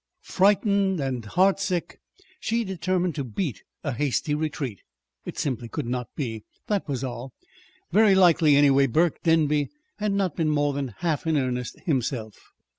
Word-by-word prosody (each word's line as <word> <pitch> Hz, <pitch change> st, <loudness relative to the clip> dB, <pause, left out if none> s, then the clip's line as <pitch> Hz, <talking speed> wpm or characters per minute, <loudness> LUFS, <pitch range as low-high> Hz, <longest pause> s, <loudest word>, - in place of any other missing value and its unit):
Frightened 200 Hz, -1 st, +2 dB
and 130 Hz, -4 st, -2 dB
heartsick, 185 Hz, -, +1 dB, 0.4 s
she 230 Hz, +1 st, 0 dB
determined 185 Hz, -2 st, -1 dB
to 145 Hz, -, -3 dB
beat 125 Hz, -, -3 dB, 0.2 s
a 145 Hz, -, -1 dB
hasty 145 Hz, +4 st, -1 dB
retreat. 145 Hz, -, -3 dB, 0.4 s
It -, -, -7 dB
simply 125 Hz, -4 st, -2 dB
could 150 Hz, +1 st, -4 dB
not 125 Hz, 0 st, -3 dB
be. 115 Hz, -7 st, -4 dB, 0.2 s
That 205 Hz, -4 st, -1 dB
was 135 Hz, -3 st, -3 dB
all. 125 Hz, 0 st, -6 dB, 0.6 s
Very 210 Hz, -2 st, +5 dB
likely, 165 Hz, -5 st, +5 dB
anyway, 140 Hz, -1 st, +5 dB
Burke 160 Hz, +6 st, +1 dB
Denby 150 Hz, -3 st, +2 dB, 0.3 s
had 210 Hz, -1 st, 0 dB
not 195 Hz, -5 st, 0 dB
been 160 Hz, -2 st, +1 dB
more 145 Hz, -1 st, +1 dB
than 140 Hz, -1 st, -2 dB
half 165 Hz, -2 st, -1 dB
in 160 Hz, -2 st, +2 dB
earnest 125 Hz, -2 st, -2 dB
himself. 125 Hz, -, -2 dB
150 Hz, 150 wpm, -25 LUFS, 130-185 Hz, 0.6 s, Very